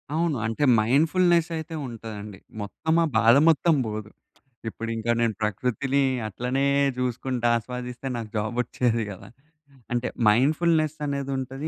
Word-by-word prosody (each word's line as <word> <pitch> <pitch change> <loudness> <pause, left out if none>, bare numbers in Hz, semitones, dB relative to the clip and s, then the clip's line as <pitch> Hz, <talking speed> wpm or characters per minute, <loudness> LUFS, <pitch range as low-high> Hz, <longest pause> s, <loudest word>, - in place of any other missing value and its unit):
అవును. 165 -2 +1
అంటే 115 +6 -1 0.2
మైండ్‌ఫుల్‌నెస్ 165 +8 +3
అయితే 160 +1 -6
ఉంటదండి. 105 -4 -8 0.2
మొత్తం 160 +10 -2
ఆ - - +3
బాధ 115 +3 +6
మొత్తం 165 +1 +3
బోదు. 105 0 -5 0.6
ఇప్పుడింక 115 0 -5
నేను 115 -2 +1
ప్రకృతిని 125 +6 0 0.3
అట్లనే 125 +6 -1 0.3
జూసుకుంటా 125 -1 -1
ఆస్వాదిస్తే 125 +2 -6
నాకు 115 -2 -6
జాబొచ్చేది 120 +1 0
గదా! 100 0 -11 0.6
అంటే 120 0 0 0.2
మైండ్‌ఫుల్‌నెస్ 155 +6 +2
అనేదుంటది. 135 0 -3
125 Hz, 115 wpm, -25 LUFS, 115-140 Hz, 0.6 s, బాధ